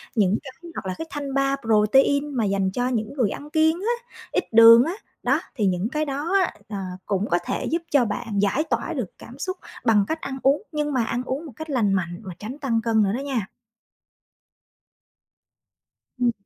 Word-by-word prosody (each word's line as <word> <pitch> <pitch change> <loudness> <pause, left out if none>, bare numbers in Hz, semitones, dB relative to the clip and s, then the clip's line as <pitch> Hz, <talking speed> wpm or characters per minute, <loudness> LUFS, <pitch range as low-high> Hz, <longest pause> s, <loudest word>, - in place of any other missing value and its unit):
những 205 -2 +3
cái 265 - -8 0.2
hoặc - - -5
là 185 - -2
cái 325 - -5
thanh 285 -2 -5
bar 275 0 +1
protein 265 +7 +4
mà 225 -3 +1
dành 195 -1 +1
cho 245 +4 -1
những 225 -2 -2
người 245 -8 +1
ăn 290 +6 -7
kiêng 315 +1 +3
á, 480 +2 -3 0.2
ít - - +1
đường 230 +1 +9
á, 335 +5 -2 0.3
đó, - - +3 0.2
thì 215 - 0
những 185 +4 0
cái 305 +3 -1
đó 290 +6 -3
á, - - -1 0.2
ờ, 205 - -4 0.3
cũng 200 0 0
có 175 - +3
thể - - -2
giúp 335 +2 0
cho 275 -5 +4
bạn 210 0 -3
giải 205 +9 +2
tỏa - - -2
được - - -3
cảm - - -12
xúc 370 0 -3 0.3
bằng 210 -3 +4
cách 320 0 -3
ăn 270 -1 -4
uống, 275 +7 +3
nhưng 295 -1 -1
mà 250 - +2
ăn 245 +2 -2
uống 270 +5 -4
một 300 - -8
cách 315 0 -7
lành 220 -8 +2
mạnh 175 -1 -2
mà 185 -2 -7
tránh 240 +7 -6
tăng 235 -6 0
cân 220 -2 +2
nữa 195 - +1
đó 245 - -2
nha. 245 -8 -2 2.7
Ừm. 240 -1 +3
245 Hz, 210 wpm, -24 LUFS, 210-290 Hz, 2.7 s, đường